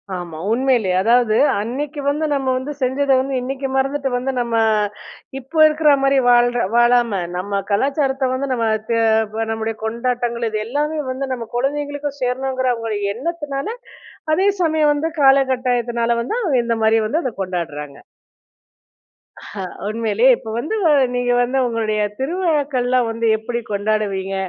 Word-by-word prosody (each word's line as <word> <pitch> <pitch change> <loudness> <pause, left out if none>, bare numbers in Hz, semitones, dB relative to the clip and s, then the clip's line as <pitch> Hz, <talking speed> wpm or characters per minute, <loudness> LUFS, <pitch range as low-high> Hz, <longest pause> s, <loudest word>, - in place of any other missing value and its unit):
ஆமா. 175 -3 -7
உண்மையிலயே 235 -6 +2
அதாவது 230 +1 +3 0.2
அன்னைக்கு 280 +8 -4
வந்து 295 +2 0
நம்ம 275 -2 -1
வந்து 260 +3 -4
செஞ்சத 270 +2 +1
வந்து, 270 +1 -2
இன்னைக்கு 270 +2 -3
மறந்துட்டு 275 +1 0
வந்து 255 +2 -1
நம்ம 235 -1 -1 0.8
இப்போ 275 +5 -5
இருக்குற 305 0 +3
மாதிரி 275 0 +3
வாழ்ற 245 0 +4 0.2
வாழாம, 240 -1 +4 0.3
நம்ம 200 +2 -2
கலாச்சாரத்த 270 +3 +1
வந்து 270 +2 -2
நம்ம 230 -2 0 0.2
தெ 230 - +1 0.4
ப 225 0 -1
நம்முடைய 225 0 -3
கொண்டாட்டங்கள் 235 0 -2
இது 215 0 -2
எல்லாமே 300 +5 -1
வந்து 265 +1 -4
நம்ம 235 -3 -6
கொழந்தைங்களுக்கும் 285 +2 -2
சேரணுங்கிற 260 +1 -1
அவங்க 230 -1 -5 0.2
எண்ணத்துனால, 285 +1 -4 0.7
அதே 380 +5 +2
சமயம் 315 -3 +3
வந்து 300 +3 -1
காலகட்டாயத்துனால 250 -3 +2
வந்து 245 - -3
அவங்க 315 - +1
இந்த 230 -1 0
மாதிரி 220 +1 +4
வந்து 315 +10 0
அத 255 -4 -3
கொண்டாடுறாங்க. 160 -6 -5 1.4
அஹ. 200 - -8 0.3
உண்மையிலயே 225 +2 +2
இப்போ 220 - -9
வந்து 300 - -2
வ - - +6 0.3
நீங்க 245 0 0
வந்து 250 +2 -1
உங்களுடைய 220 -2 -1 0.2
திருவிழாக்கள்லாம் 275 -6 0
வந்து 230 0 -1
எப்படி 235 +2 -4
கொண்டாடுவீங்க? 200 -2 -1
250 Hz, 140 wpm, -19 LUFS, 230-275 Hz, 1.4 s, வ